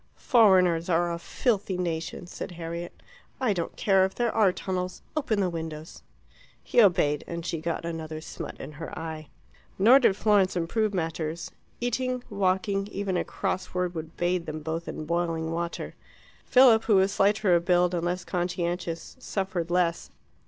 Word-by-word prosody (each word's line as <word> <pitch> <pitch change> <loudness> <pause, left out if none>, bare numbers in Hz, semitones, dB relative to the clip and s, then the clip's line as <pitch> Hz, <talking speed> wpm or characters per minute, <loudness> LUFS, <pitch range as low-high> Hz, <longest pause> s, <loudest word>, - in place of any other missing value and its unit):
"Foreigners 185 - +4
are 175 0 +2
a 170 - -4
filthy 200 0 -1
nation," 170 0 -3
said 175 - -7
Harriet. 170 0 -7 0.4
"I 250 -6 +2
don't 170 -3 -4
care 195 -2 +3
if 190 0 -1
there 240 -2 +1
are 205 -4 +4
tunnels; 185 0 -4
open 240 -9 0
the 190 - +2
windows." 160 -1 -7 0.6
He 240 - +4
obeyed, 155 -7 +3
and 170 0 -5
she 165 -2 -3
got 165 0 -3
another 160 -2 -5
smut 155 - -8
in - - -7
her 160 +2 -8
eye. 160 -2 -6 0.5
Nor 235 +8 +7
did 235 -7 +3
Florence 205 -4 +3
improve 205 +5 0
matters. 165 -2 -3 0.3
Eating, 250 +1 -1
walking, 195 0 0
even 200 -2 -3
a - - +1
cross 185 0 -3
word 180 -1 0
would 160 -1 -7
bathe 175 0 0
them 155 0 -5
both 160 +2 -4
in 155 - -5
boiling 165 -1 -1
water. 170 +1 -4 0.5
Philip, 245 -4 +6
who 215 - +4
was 190 +1 +4
slighter 200 -1 +3
of 170 0 +2
build, 180 0 +3
and 170 -1 -1
less 180 +1 -1
conscientious, 175 -1 -3
suffered 190 -7 -3
less. 175 -1 0
180 Hz, 165 wpm, -27 LUFS, 165-195 Hz, 0.6 s, Nor